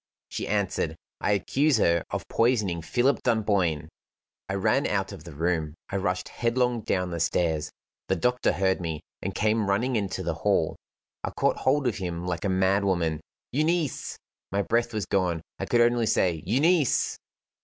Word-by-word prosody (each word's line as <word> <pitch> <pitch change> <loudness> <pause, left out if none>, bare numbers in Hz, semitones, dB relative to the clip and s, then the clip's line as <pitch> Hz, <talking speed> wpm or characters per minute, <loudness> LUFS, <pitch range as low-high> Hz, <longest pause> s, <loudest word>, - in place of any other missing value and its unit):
She - - -4
answered: 95 -6 0 0.2
"I 105 - +1
accuse 135 +8 +2
her 85 -5 +3
of - - -4
poisoning 105 -8 +1
Philip 125 - +1
Dunboyne." 100 -9 +1 0.6
I 95 - -1
ran 95 - +2
out - - -1
of 75 - -10
the 85 - -8
room; 80 -1 -1 0.2
I 100 - 0
rushed 95 -1 -1
headlong 120 0 0
down 90 -3 -1
the 85 - -3
stairs. 80 -2 +1 0.4
The 95 - +2
doctor 125 +8 +1
heard 95 0 +1
me, 80 -3 -3 0.2
and 95 0 -4
came 110 -1 +1
running 120 +6 +1
into 100 -3 -1
the 85 -1 -1
hall. 100 -6 +2 0.5
I - - -1
caught - - +1
hold 135 +2 +2
of 120 - 0
him 90 -3 -4
like 85 -2 -2
a - - +1
madwoman. 95 -4 +1 0.3
"Euneece!" 155 +1 0 0.3
My 100 +1 +1
breath 120 +2 +1
was 110 -3 -2
gone; 90 -4 0 0.2
I - - -3
could 120 - +3
only 120 -1 +3
say: 85 -5 +2
"Euneece!" 150 - +2
100 Hz, 165 wpm, -27 LUFS, 85-120 Hz, 0.6 s, her